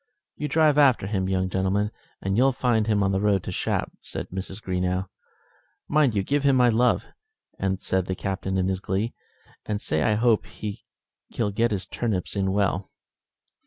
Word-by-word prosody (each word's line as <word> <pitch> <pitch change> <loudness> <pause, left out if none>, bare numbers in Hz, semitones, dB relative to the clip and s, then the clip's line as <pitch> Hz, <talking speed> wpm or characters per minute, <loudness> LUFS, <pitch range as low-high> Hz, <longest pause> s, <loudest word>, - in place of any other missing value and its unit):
"You 150 - -3
drive 150 0 +4
after 130 -8 +5
him, 95 -2 -1
young 95 -1 +1
gentleman, 95 +3 0 0.3
and 95 0 0
you'll 130 +4 +4
find 120 -4 +1
him 105 -2 +2
on 95 - +2
the 95 0 0
road 100 -3 +2
to - - -5
Shap," - - -1
said - - -5
Mrs. 95 +2 -6
Greenow. 90 -1 -1 0.8
"Mind 145 -6 +3
you 100 - +1
give 145 +7 +1
him 140 -1 +4
my 125 -1 +5
love," 120 +2 +2 0.8
said 95 -1 0
the 95 - -1
Captain 95 0 -2
in 95 0 +1
his 95 -1 -1
glee, 100 +5 -2 0.5
"and 105 -1 -1
say - - -1
I 105 - +3
hope 115 0 +2
he'll 105 +1 -6
get 115 +3 +2
his 100 -4 -2
turnips 105 -6 -2
in 95 -1 +1
well." 100 -1 0
100 Hz, 175 wpm, -25 LUFS, 95-120 Hz, 0.8 s, after